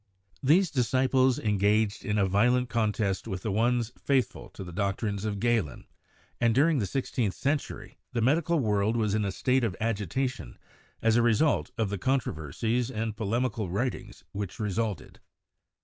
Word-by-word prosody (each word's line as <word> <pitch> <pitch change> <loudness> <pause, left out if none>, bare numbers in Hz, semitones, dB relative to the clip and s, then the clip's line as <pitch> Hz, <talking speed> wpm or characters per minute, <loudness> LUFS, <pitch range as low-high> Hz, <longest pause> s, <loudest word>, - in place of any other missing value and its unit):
These 170 +7 +4
disciples 130 0 +2
engaged 105 0 +1
in 105 0 -1
a 100 - +3
violent 120 +6 +2
contest 105 -3 0
with 95 -4 -4
the 110 - -1
ones 120 +2 +1
faithful 130 -4 0
to - - -6
the 90 - -8
doctrines 100 +2 -2
of 105 -2 -2
Galen, 115 - 0 0.5
and 115 -1 +2
during 150 +2 +4
the 100 - -1
sixteenth 120 -2 -1
century 145 +1 -3
the 125 - -1
medical 165 +7 +2
world 105 -1 +1
was 105 -3 0
in 110 0 +1
a 100 - -1
state 130 +6 +1
of 105 -6 -1
agitation 115 - -2 0.5
as 115 0 +4
a - - +5
result 120 +6 +2
of 110 -4 0
the 100 - -3
controversies 115 - -1
and 110 -3 -3
polemical 115 -1 -1
writings 120 +8 -3
which 100 -2 -5
resulted. 105 -1 -3
115 Hz, 155 wpm, -28 LUFS, 100-125 Hz, 0.5 s, a